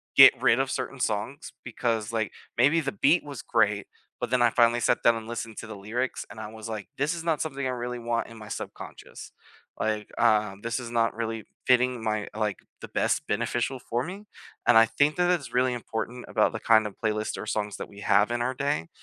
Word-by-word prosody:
get - - +9
rid 120 - +4
of 135 0 +1
certain 130 +1 -4
songs 110 +4 -2
because 115 -2 -2
like 110 -2 -1 0.3
maybe 145 +7 +4
the 140 -2 -2
beat 145 - +3
was 145 -3 -7
great, 105 -3 +1 0.3
but 125 - -2
then 125 0 +2
I 120 - +6
finally 120 0 +3
sat 120 - +2
down 115 0 +5
and 110 -1 -6
listened 115 -1 -5
to - - -7
the 110 - -7
lyrics, 115 +6 -3
and - - -10
I 105 0 -7
was 110 0 -8
like, 110 -3 -6
"This 145 +5 +1
is 165 -1 -5
not 165 -2 0
something 140 -3 -3
I - - 0
really 125 0 -3
want 115 0 -1
in 115 - -12
my 105 -1 -10
subconscious," - - -8 0.5
like, 110 -1 -1
uh, 105 -4 +3
"This 115 +4 -2
is 120 -1 -7
not 115 -2 +1
really 115 -2 -3 0.2
fitting 125 -2 +3
my, 110 -1 -1
like, 105 -2 -1 0.2
the - - -8
best - - 0
beneficial 125 +2 -1
for 120 0 -2
me," 195 +7 -7 0.4
and 120 - +7
I 115 - +8
think 145 +6 +2
that 180 0 +2
it's 170 -6 -1
really 125 +1 +3
important 120 +1 -5
about - - +2
the - - -5
kind 110 -1 +4
of 105 - -5
playlists 110 0 -1
or - - -6
songs 105 -1 -2
that - - -6
we 100 0 -12
have 100 +2 +4
in 120 0 -1
our 130 +2 0
day, 135 - -1
115 Hz, 225 wpm, -27 LUFS, 110-130 Hz, 0.5 s, get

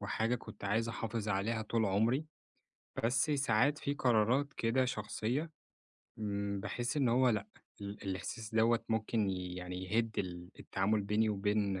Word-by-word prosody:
وحاجة 110 +3 0
كنت 120 - -8
عايز 110 +4 +1
أحافظ 115 -1 -3
عليها 105 +3 0
طول 110 +1 0
عمري، 110 +9 +2 0.8
بس 125 +5 +3
ساعات 135 0 +3
في 140 - -1
قرارات 125 +2 +2
كده 120 +3 +2
شخصية 125 +5 -2 0.7
امم، 100 -1 -2
باحس 120 +7 -2
إن 135 -4 +3
هو 125 +2 +4
لأ 105 -3 0 0.3
ال 100 +1 -6
الإحساس 110 +4 -4
دوّة 115 +1 +3
ممكن 110 -2 +1
يعني 90 0 -4
يهد 110 +3 0
ال 90 -1 -4
التعامل 105 +2 0
بيني 105 +2 +2
وبين 100 -1 0
110 Hz, 140 wpm, -34 LUFS, 100-120 Hz, 0.8 s, هو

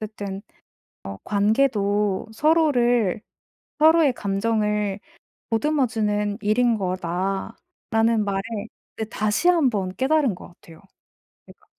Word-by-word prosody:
어쨌든 205 -2 -6 0.6
어 95 0 -7
'관계도 205 -2 +1
서로를 245 - +2 0.6
서로의 315 -3 +5
감정을 210 -1 -1 0.5
보듬어 270 +4 +1
주는 210 -3 -1
일인 230 +3 +2
거다.'라는 195 - -2
말을 195 -1 -1 0.5
그때 220 -1 -5
다시 215 +11 0
한번 240 - +1
깨달은 270 -4 +2
것 - - -12
같아요, 165 -1 -17 0.6
제가. - - -19
215 Hz, 225 characters per minute, -23 LUFS, 200-250 Hz, 0.6 s, 서로의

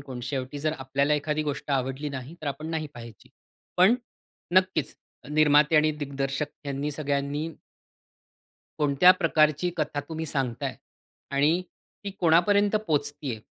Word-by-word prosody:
कोण? 130 -3 -8
शेवटी 130 +2 -4
जर 155 +1 0
आपल्याला 140 +3 +1
एखादी 150 +1 -1
गोष्ट 145 0 -4
आवडली 135 +2 -1
नाही, 135 +3 -7
तर 155 - -7
आपण 140 +3 -4
नाही 155 -1 -2
पाहायची. 115 -3 -12 0.5
पण 190 +7 +6 0.6
नक्कीच 185 -5 +2 0.4
निर्माते 150 0 +4
आणि 155 0 +5
दिग्दर्शक 140 0 -2 0.2
ह्यांनी 140 +1 -2
सगळ्यांनी 145 +1 -2 1.3
कोणत्या 150 +4 +5
प्रकारची 155 +1 +3
कथा 150 -2 -1
तुम्ही 160 0 -4
सांगताय 130 -5 -2 0.6
आणि 150 +6 +2 0.4
ती 200 - -3
कोणापर्यंत 200 +5 +4
पोहचतेय, 145 -5 -1
150 Hz, 125 wpm, -26 LUFS, 140-155 Hz, 1.3 s, पण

